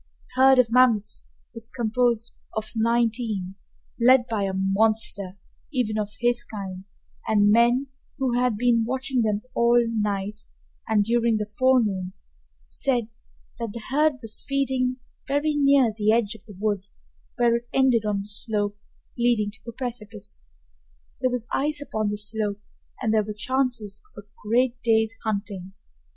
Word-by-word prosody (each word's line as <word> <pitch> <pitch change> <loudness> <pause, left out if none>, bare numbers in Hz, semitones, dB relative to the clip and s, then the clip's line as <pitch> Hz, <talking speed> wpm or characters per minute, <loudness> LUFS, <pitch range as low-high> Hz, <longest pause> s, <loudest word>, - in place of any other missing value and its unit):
The 260 - +1
herd 265 0 +7
of 245 -3 +4
mammoths 235 -4 +3 0.3
was 230 -1 -6
composed 235 0 0 0.2
of 220 0 -3
nineteen, 225 -4 0 0.5
led 250 +1 +6
by 215 -4 -1
a 195 - -1
monster 195 0 +1 0.3
even 225 -6 -1
of 210 -1 -4
his 240 0 +2
kind, 190 -3 -7 0.4
and 205 -1 +4
men 240 +4 +4 0.3
who 265 -3 0
had 245 -3 +1
been 235 0 +3
watching 260 +1 -1
them 215 -2 0
all 235 +1 +4
night 210 -2 -2 0.5
and 215 -2 +3
during 230 0 +2
the 210 - -2
forenoon 210 -5 +1 0.5
said 235 - -1 0.5
that 230 -3 -4
the 235 - -6
herd 300 +2 +3
was 220 -1 -1
feeding 265 -2 0 0.3
very 290 +2 +1
near 275 -5 +4
the 215 0 +2
edge 225 -2 +1
of 220 - -16
the 210 - -12
wood, 205 -2 -1 0.5
where 235 -1 +3
it 235 0 -4
ended 260 -4 +3
on 205 -2 -1
the 200 - -9
slope 205 -1 0 0.4
leading 235 -4 +2
to - - -15
the 235 - -7
precipice. 220 -5 -4 0.8
There 255 - +1
was 250 -2 -3
ice 295 +2 +1
upon 215 -7 -2
the 210 - -3
slope 210 -1 -1 0.4
and 220 -2 +1
there 220 - +4
were 210 +1 -5
chances 240 -3 0 0.2
of 205 - -8
a - - -36 0.2
great 245 +2 +1
day's 225 -1 +2
hunting. 200 -3 -4
225 Hz, 155 wpm, -25 LUFS, 210-245 Hz, 0.8 s, herd